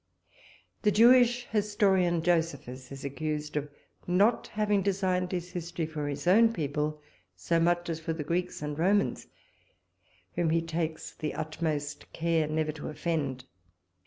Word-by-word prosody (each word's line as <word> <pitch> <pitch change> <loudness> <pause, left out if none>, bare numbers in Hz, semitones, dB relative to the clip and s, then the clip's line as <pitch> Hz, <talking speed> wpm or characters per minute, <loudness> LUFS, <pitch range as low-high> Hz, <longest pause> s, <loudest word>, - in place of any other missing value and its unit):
The 210 - +3
Jewish 245 +2 +5
historian, 195 -5 +2
Josephus, 145 -7 -1
is 135 +1 -7
accused 150 +1 -3
of 150 0 -2 0.4
not 200 +6 +3
having 210 -2 +1
designed 185 -2 0
his 180 -1 -3
history 175 -2 -3
for 155 -2 -4
his 145 0 -4
own 225 +6 +6
people 150 -2 -2 0.3
so 165 - 0
much 175 +1 +2
as 165 -1 -3
for 165 0 -3
the 160 -2 -3
Greeks 175 +1 -2
and 150 0 -4
Romans, 200 +4 +1 1.1
whom 170 -2 +1
he 165 +1 +2
takes 165 -1 -3
the 155 - -5
utmost 155 -2 -3
care 165 -2 +1
never 155 0 0
to 150 0 -7
offend. 145 -5 -2
165 Hz, 140 wpm, -29 LUFS, 150-185 Hz, 1.1 s, own